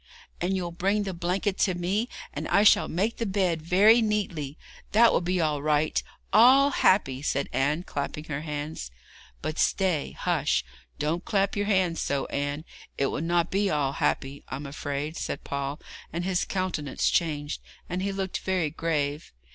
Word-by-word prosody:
'And 185 Hz, +2 st, +1 dB
you'll 175 Hz, -2 st, -3 dB
bring 195 Hz, +5 st, 0 dB
the 195 Hz, -2 st, -4 dB
blanket 185 Hz, +3 st, -1 dB
to 185 Hz, -3 st, +2 dB
me, 195 Hz, +7 st, -1 dB, 0.2 s
and 150 Hz, +2 st, -4 dB
I 200 Hz, -, +4 dB
shall 210 Hz, -, +6 dB
make 205 Hz, +7 st, -1 dB
the 230 Hz, -, -1 dB
bed 185 Hz, -4 st, 0 dB
very 200 Hz, +8 st, +5 dB
neatly. 185 Hz, -10 st, -1 dB, 0.4 s
That 230 Hz, +2 st, +6 dB
will -, -, +2 dB
be 180 Hz, +1 st, 0 dB
all 150 Hz, -3 st, +1 dB
right 150 Hz, +1 st, +1 dB, 0.3 s
all 260 Hz, +6 st, +7 dB
happy!' 135 Hz, -, +3 dB
said 140 Hz, -1 st, -1 dB
Anne, 150 Hz, +5 st, +1 dB
clapping 145 Hz, -2 st, -4 dB
her 150 Hz, -2 st, -4 dB
hands. 150 Hz, -, -5 dB, 0.5 s
'But 155 Hz, +2 st, -3 dB
stay! 185 Hz, -7 st, +1 dB
Hush! -, -, +1 dB, 0.3 s
don't 165 Hz, +4 st, -1 dB
clap 200 Hz, -2 st, +1 dB
your 205 Hz, 0 st, -1 dB
hands 185 Hz, -5 st, +2 dB
so, 140 Hz, -1 st, -1 dB
Anne. 145 Hz, +2 st, -2 dB, 0.3 s
It 140 Hz, -, +1 dB
will -, -, -2 dB
not 170 Hz, +1 st, +1 dB
be 200 Hz, +1 st, +1 dB
all 145 Hz, -4 st, +1 dB
happy, 140 Hz, 0 st, -1 dB
I'm 135 Hz, +3 st, -5 dB
afraid,' 145 Hz, +2 st, -4 dB
said -, -, -4 dB
Paul, 140 Hz, +1 st, -3 dB, 0.3 s
and 170 Hz, +2 st, -3 dB
his 185 Hz, -1 st, +1 dB
countenance 180 Hz, -8 st, -1 dB
changed, 150 Hz, -3 st, -1 dB, 0.3 s
and 180 Hz, +1 st, -3 dB
he 200 Hz, +1 st, -1 dB
looked 195 Hz, -1 st, -3 dB
very 180 Hz, -5 st, 0 dB
grave. 150 Hz, -2 st, -2 dB
170 Hz, 170 wpm, -27 LUFS, 150-195 Hz, 0.5 s, all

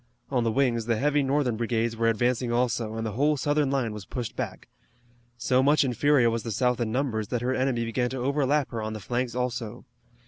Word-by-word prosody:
On 125 Hz, -3 st, +1 dB
the 115 Hz, -, +1 dB
wings 120 Hz, -3 st, +1 dB
the 115 Hz, -, +2 dB
heavy 145 Hz, +3 st, +2 dB
Northern 135 Hz, -4 st, +1 dB
brigades 115 Hz, 0 st, 0 dB
were 115 Hz, 0 st, +2 dB
advancing 120 Hz, +2 st, 0 dB
also, 120 Hz, -2 st, 0 dB
and 115 Hz, 0 st, -3 dB
the 110 Hz, -, -2 dB
whole 145 Hz, +7 st, +2 dB
Southern 145 Hz, 0 st, +1 dB
line 130 Hz, -5 st, 0 dB
was 105 Hz, -2 st, -7 dB
pushed 120 Hz, -3 st, -5 dB
back. -, -, -5 dB, 0.7 s
So 125 Hz, +2 st, +2 dB
much 145 Hz, +3 st, +4 dB
inferior 130 Hz, -1 st, +3 dB
was 115 Hz, 0 st, -1 dB
the 115 Hz, -, -6 dB
South 125 Hz, +3 st, +1 dB
in 115 Hz, -2 st, -1 dB
numbers 115 Hz, -4 st, -1 dB
that 120 Hz, +2 st, -2 dB
her 130 Hz, +1 st, +1 dB
enemy 130 Hz, -3 st, 0 dB
began 125 Hz, +2 st, -1 dB
to 130 Hz, -, -5 dB
overlap 140 Hz, +2 st, +1 dB
her 115 Hz, -2 st, -3 dB
on 110 Hz, 0 st, -3 dB
the 110 Hz, -, -5 dB
flanks 120 Hz, +4 st, -2 dB
also. 120 Hz, -2 st, -3 dB
125 Hz, 215 wpm, -26 LUFS, 115-135 Hz, 0.7 s, much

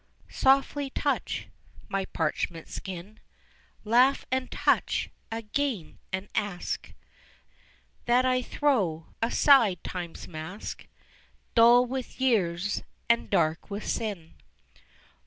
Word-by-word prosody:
Softly 275 Hz, +1 st, +2 dB
touch -, -, -1 dB, 0.4 s
my 195 Hz, -1 st, -1 dB
parchment 165 Hz, 0 st, -2 dB
skin, 190 Hz, +3 st, -7 dB, 0.6 s
Laugh 250 Hz, +5 st, +4 dB
and 260 Hz, 0 st, 0 dB
touch -, -, +1 dB, 0.2 s
again 225 Hz, -, -3 dB
and 190 Hz, +1 st, -3 dB
ask 205 Hz, -4 st, -3 dB, 1.1 s
That 245 Hz, +2 st, +4 dB
I 255 Hz, 0 st, +2 dB
throw 205 Hz, -, 0 dB, 0.2 s
aside 230 Hz, -, +4 dB
time's 175 Hz, -2 st, -6 dB
mask, 160 Hz, +5 st, -7 dB, 0.7 s
Dull 240 Hz, +2 st, +7 dB
with 255 Hz, 0 st, -5 dB
years 200 Hz, -7 st, +1 dB, 0.3 s
and 235 Hz, -, +1 dB
dark 160 Hz, -4 st, +1 dB
with 205 Hz, +1 st, -5 dB
sin. 200 Hz, -8 st, -3 dB
215 Hz, 95 wpm, -28 LUFS, 180-255 Hz, 1.1 s, Dull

